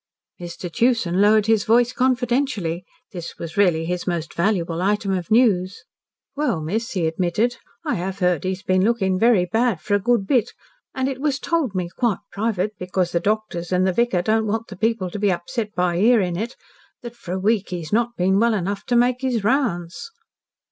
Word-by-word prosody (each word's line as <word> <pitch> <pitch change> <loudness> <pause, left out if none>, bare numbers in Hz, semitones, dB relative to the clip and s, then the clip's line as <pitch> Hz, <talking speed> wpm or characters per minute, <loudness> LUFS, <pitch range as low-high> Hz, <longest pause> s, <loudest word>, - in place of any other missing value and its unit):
Mr. 175 0 -7
Tewson 200 -1 +1
lowered 210 0 +5
his 220 -2 +3
voice 240 +2 +3
confidentially. 245 -9 0 0.3
This 175 -3 -7
was 165 -1 -7
really 175 -5 +2
his 180 +2 -3
most 170 -3 -2
valuable 170 -3 0
item 200 +1 0
of 180 -2 -4
news. 205 -5 +2 0.5
"Well, 280 - 0
miss," 210 +10 -3
he 180 -4 0
admitted, 180 +9 0 0.3
"I - - 0
have 190 -1 -3
heard 180 -4 +1
that - - -4
he's 190 +1 -3
been 185 0 +2
looking 195 -4 +1
very 225 -5 +4
bad 225 +1 +1
for 205 - -3
a 205 - +4
good 235 -1 +1
bit, 245 0 +1 0.4
and 260 -1 0
it 270 -1 -4
was 285 -3 +1
told 285 - -1
me 180 -2 -1
quite 235 -6 +1
private, 210 -1 -1
because 180 -1 -1
the 170 - +1
doctors 200 -3 -2
and 185 0 +2
the 190 - +1
vicar 215 -5 +1
don't 220 +2 +1
want 225 +2 -2
the 195 - -8
people 215 -2 -1
to 205 - -5
be 205 -1 +2
upset 210 +5 -4
by 180 -1 +1
hearing 205 -5 +3
it 225 +7 -4 0.5
that 240 0 -8
for 180 -6 -7
a 190 - -2
week 205 +1 +1
he's 175 -1 -5
not 235 +1 +1
been 190 +2 +2
well 230 0 +3
enough 195 +1 -3
to 245 - 0
make 245 +1 +2
his 250 -5 -1
rounds." 215 - -1
200 Hz, 195 wpm, -22 LUFS, 180-235 Hz, 0.5 s, lowered